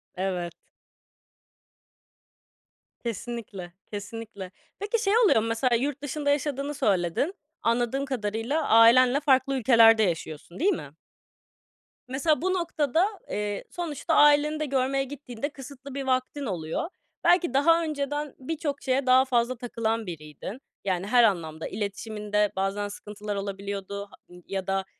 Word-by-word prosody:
Evet. 180 Hz, -2 st, -2 dB, 2.5 s
Kesinlikle, 225 Hz, -5 st, -6 dB, 0.2 s
kesinlikle. 205 Hz, -2 st, -7 dB, 0.3 s
Peki 420 Hz, +3 st, -1 dB
şey 395 Hz, -, +2 dB
oluyor 420 Hz, -, +5 dB
mu 225 Hz, -, -2 dB
mesela, 235 Hz, +2 st, +1 dB
yurt 275 Hz, +3 st, -1 dB
dışında 290 Hz, 0 st, -2 dB
yaşadığını 285 Hz, 0 st, 0 dB
söyledin. 205 Hz, -, +1 dB, 0.3 s
Anladığım 240 Hz, +4 st, +1 dB
kadarıyla 245 Hz, +4 st, -2 dB
ailenle 245 Hz, +4 st, +7 dB
farklı 275 Hz, -1 st, +3 dB
ülkelerde 225 Hz, -3 st, +6 dB
yaşıyorsun, 170 Hz, -, -3 dB
değil 390 Hz, +6 st, +3 dB
mi? 145 Hz, -, -7 dB, 1.1 s
Mesela 285 Hz, +4 st, +1 dB
bu 370 Hz, +2 st, +1 dB
noktada, 335 Hz, -2 st, +1 dB, 0.2 s
eee, 205 Hz, -1 st, -3 dB
sonuçta 330 Hz, -5 st, -3 dB
aileni 295 Hz, +1 st, +5 dB
de 305 Hz, -, 0 dB
görmeye 270 Hz, 0 st, +1 dB
gittiğinde 270 Hz, -1 st, -6 dB
kısıtlı 275 Hz, -1 st, -10 dB
bir 275 Hz, -, -2 dB
vaktin 265 Hz, +2 st, -1 dB
oluyor. 170 Hz, -, -3 dB, 0.3 s
Belki 350 Hz, -1 st, +4 dB
daha 330 Hz, +5 st, +4 dB
önceden 290 Hz, -1 st, -3 dB
birçok 290 Hz, +1 st, -3 dB
şeye 265 Hz, 0 st, 0 dB
daha 255 Hz, +1 st, +6 dB
fazla 250 Hz, -1 st, +1 dB
takılan 230 Hz, -2 st, -2 dB
biriydin. 165 Hz, -, -8 dB, 0.2 s
Yani 185 Hz, 0 st, -1 dB
her 240 Hz, +2 st, +5 dB
anlamda 160 Hz, -6 st, 0 dB
iletişiminde 210 Hz, 0 st, -2 dB
bazen 195 Hz, +2 st, -1 dB
sıkıntılar 210 Hz, 0 st, -6 dB
olabiliyordu 200 Hz, 0 st, -4 dB
h 205 Hz, -, -25 dB, 0.2 s
eee, 180 Hz, -, -13 dB
ya 190 Hz, -1 st, -3 dB
da, 195 Hz, 0 st, 0 dB
240 Hz, 125 wpm, -27 LUFS, 205-285 Hz, 2.5 s, ailenle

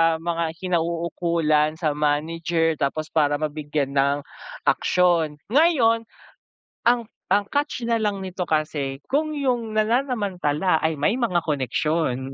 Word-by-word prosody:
mga 165 Hz, 0 st, -2 dB
kinauukulan, 170 Hz, -3 st, 0 dB
sa 160 Hz, -2 st, 0 dB
manager, 160 Hz, +2 st, 0 dB
tapos 155 Hz, +3 st, -2 dB
para 145 Hz, -2 st, +2 dB
mabigyan 145 Hz, -2 st, -2 dB
ng 140 Hz, +1 st, +2 dB, 0.5 s
aksyon. 170 Hz, -4 st, +2 dB, 0.2 s
Ngayon 240 Hz, -7 st, +3 dB, 0.8 s
ang 240 Hz, -1 st, +2 dB, 0.2 s
ang 200 Hz, +2 st, +3 dB
catch 285 Hz, -4 st, -1 dB
nalang 220 Hz, -3 st, 0 dB
nito 185 Hz, -1 st, -5 dB
kasi, 150 Hz, -3 st, -1 dB
kung 305 Hz, +2 st, -1 dB
'yung 240 Hz, -6 st, -1 dB
nananamantala 205 Hz, -, +1 dB
ay 160 Hz, -1 st, 0 dB
may 145 Hz, +8 st, +2 dB
mga 230 Hz, -9 st, 0 dB
koneksyon, 135 Hz, -1 st, -1 dB
165 Hz, 110 wpm, -23 LUFS, 150-215 Hz, 0.8 s, Ngayon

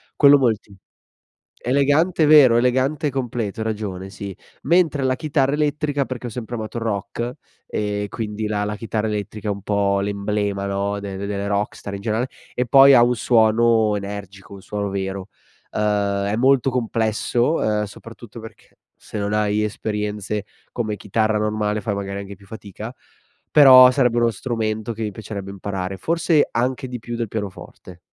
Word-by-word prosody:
quello 145 Hz, -1 st, +7 dB
molti 110 Hz, -5 st, -1 dB, 0.8 s
elegante 145 Hz, +6 st, +2 dB
vero, 140 Hz, -6 st, +7 dB
elegante 130 Hz, +5 st, +1 dB
e -, -, +1 dB
completo, 120 Hz, -5 st, -3 dB
hai -, -, -3 dB
ragione, 100 Hz, -4 st, -4 dB
sì. 100 Hz, -2 st, -7 dB, 0.3 s
Mentre 165 Hz, -5 st, +2 dB
la 130 Hz, -1 st, +1 dB
chitarra 140 Hz, -1 st, 0 dB
elettrica, 150 Hz, -1 st, 0 dB
perché 125 Hz, -1 st, -6 dB
ho -, -, -5 dB
sempre 120 Hz, +1 st, -6 dB
amato 110 Hz, +1 st, -6 dB
il 115 Hz, -, -3 dB
rock 115 Hz, +3 st, -3 dB, 0.3 s
e 105 Hz, -1 st, -2 dB
quindi 110 Hz, -1 st, -4 dB
la 105 Hz, -1 st, -1 dB
la 105 Hz, 0 st, -3 dB
chitarra 110 Hz, 0 st, -2 dB
elettrica 105 Hz, 0 st, -4 dB
è -, -, +1 dB
un 100 Hz, -1 st, -6 dB
po' 100 Hz, -1 st, +1 dB
l'emblema, 100 Hz, 0 st, -2 dB
no, 100 Hz, +1 st, -2 dB
de 100 Hz, -1 st, -6 dB
delle 100 Hz, 0 st, -3 dB
rockstar 100 Hz, 0 st, -3 dB
in 100 Hz, -, -7 dB
generale 110 Hz, +4 st, -1 dB, 0.3 s
e 125 Hz, 0 st, -1 dB
poi 135 Hz, +2 st, +8 dB
ha 125 Hz, -, +7 dB
un 120 Hz, +1 st, +3 dB
suono 110 Hz, -1 st, +3 dB
energico, 100 Hz, -1 st, -7 dB
un 100 Hz, -, -10 dB
suono 105 Hz, 0 st, -4 dB
vero. 95 Hz, 0 st, -4 dB, 0.4 s
Uhm, 100 Hz, -2 st, 0 dB
è 100 Hz, +1 st, 0 dB
molto 135 Hz, +1 st, +3 dB
complesso, 120 Hz, +2 st, 0 dB
uhm, 105 Hz, -6 st, 0 dB
soprattutto 115 Hz, +2 st, -11 dB
perché 115 Hz, 0 st, -14 dB, 0.2 s
se -, -, -9 dB
non 100 Hz, +1 st, -2 dB
hai 105 Hz, 0 st, +1 dB
esperienze 105 Hz, -1 st, -3 dB, 0.3 s
come 110 Hz, -3 st, -2 dB
chitarra 110 Hz, +2 st, 0 dB
normale, 105 Hz, 0 st, -1 dB
fai 105 Hz, -2 st, -2 dB
magari 100 Hz, 0 st, -4 dB
anche 100 Hz, 0 st, -9 dB
più 100 Hz, -, -19 dB
fatica, 110 Hz, +2 st, -9 dB, 0.6 s
però 130 Hz, -3 st, +9 dB
sarebbe 125 Hz, -3 st, +2 dB
uno 120 Hz, 0 st, +3 dB
strumento 110 Hz, -1 st, -3 dB
che 115 Hz, -, -8 dB
mi 105 Hz, -, -2 dB
piacerebbe 100 Hz, -1 st, -7 dB
imparare, 95 Hz, -1 st, -4 dB
forse 165 Hz, -, +2 dB
anche 130 Hz, +2 st, -1 dB
di 125 Hz, -1 st, -6 dB
più 120 Hz, +1 st, -6 dB
del 115 Hz, -1 st, -2 dB
pianoforte. 95 Hz, -3 st, -8 dB
110 Hz, 165 wpm, -21 LUFS, 100-125 Hz, 0.8 s, però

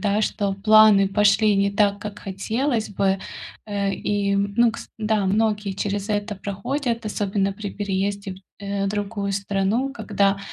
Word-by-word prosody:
да, 205 Hz, +1 st, +1 dB
что 200 Hz, -2 st, -1 dB
планы 215 Hz, -2 st, +7 dB
пошли 205 Hz, +1 st, +3 dB
не 200 Hz, 0 st, +2 dB
так, 200 Hz, 0 st, +2 dB
как 210 Hz, 0 st, -7 dB
хотелось 220 Hz, +5 st, -2 dB
бы. 195 Hz, -1 st, +1 dB, 0.5 s
Э, 200 Hz, -1 st, -1 dB
и, 200 Hz, -1 st, -1 dB
ну, 210 Hz, +4 st, +2 dB
кс -, -, -9 dB
да, 215 Hz, -2 st, 0 dB
многие 210 Hz, 0 st, +1 dB
через 200 Hz, +1 st, -3 dB
это 205 Hz, 0 st, -1 dB
проходят, 230 Hz, +4 st, -3 dB
особенно 200 Hz, -1 st, -1 dB
при 205 Hz, 0 st, -6 dB
переезде 200 Hz, 0 st, -2 dB
в, 185 Hz, -, -13 dB, 0.2 s
э, 200 Hz, 0 st, -1 dB
другую 205 Hz, 0 st, -2 dB
страну, 200 Hz, +7 st, 0 dB
когда 200 Hz, -6 st, 0 dB
205 Hz, 150 wpm, -23 LUFS, 195-215 Hz, 0.5 s, планы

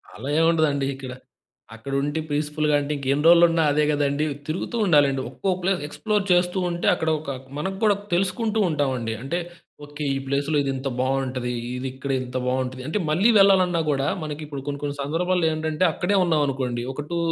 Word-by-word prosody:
అలా 130 Hz, +6 st, -6 dB
ఏముండదండి 155 Hz, -4 st, +2 dB
ఇక్కడ. 135 Hz, -1 st, -8 dB, 0.6 s
అక్కడుండి 140 Hz, +6 st, -2 dB
పీస్‌ఫుల్‌గా 150 Hz, 0 st, 0 dB
అంటే 145 Hz, +1 st, -3 dB
ఇంకెన్ని 140 Hz, +1 st, -1 dB
రోజులున్నా 170 Hz, -1 st, +6 dB
అదే 150 Hz, +1 st, +2 dB
కదండీ. 145 Hz, 0 st, 0 dB, 0.2 s
తిరుగుతూ 170 Hz, +8 st, -3 dB
ఉండాలండి. 145 Hz, -7 st, +3 dB
ఒక్కో 195 Hz, -, -2 dB
ప్లేస్ 190 Hz, -1 st, +1 dB
ఎక్స్‌ప్లోర్ 210 Hz, +6 st, -1 dB
చేస్తూ 180 Hz, +1 st, +3 dB
ఉంటే 175 Hz, 0 st, -3 dB
అక్కడ 160 Hz, -, -1 dB
ఒక 150 Hz, -1 st, -7 dB, 0.3 s
మన 150 Hz, -, -1 dB
కూడా 210 Hz, -2 st, +5 dB, 0.2 s
తెలుసుకుంటూ 195 Hz, +5 st, 0 dB
ఉంటాం 145 Hz, -4 st, 0 dB
అండి. 115 Hz, -1 st, -3 dB
అంటే 140 Hz, +6 st, -2 dB, 0.5 s
ఓకే 145 Hz, +1 st, -6 dB
ఈ -, -, -2 dB
ప్లేస్ 140 Hz, +1 st, -1 dB
లో -, -, +2 dB
ఇది 140 Hz, -, -1 dB
ఇంత 135 Hz, +1 st, -3 dB
బావుంటది. 130 Hz, -1 st, -1 dB, 0.2 s
ఇది 130 Hz, +1 st, -4 dB
ఇక్కడ 135 Hz, +1 st, -4 dB
ఇంత 125 Hz, 0 st, -7 dB
బాగుంటది. 130 Hz, 0 st, -2 dB
అంటే 160 Hz, +8 st, -1 dB
మళ్ళీ 180 Hz, +9 st, +3 dB
వెళ్లాలన్నా 185 Hz, -3 st, +4 dB
గూడా 135 Hz, -1 st, 0 dB, 0.2 s
మనకిప్పుడు 150 Hz, -2 st, -6 dB
కొన్ని 140 Hz, 0 st, -4 dB
కొన్ని 145 Hz, 0 st, -3 dB
సందర్భాల్లో 170 Hz, +4 st, 0 dB
ఏంటంటే 155 Hz, +2 st, -1 dB
అక్కడే 190 Hz, +6 st, 0 dB
ఉన్నాం 160 Hz, -4 st, +2 dB
అనుకోండి. 125 Hz, -3 st, -2 dB
ఒక 145 Hz, -, -5 dB
2 170 Hz, -, -1 dB
150 Hz, 175 wpm, -24 LUFS, 135-170 Hz, 0.6 s, రోజులున్నా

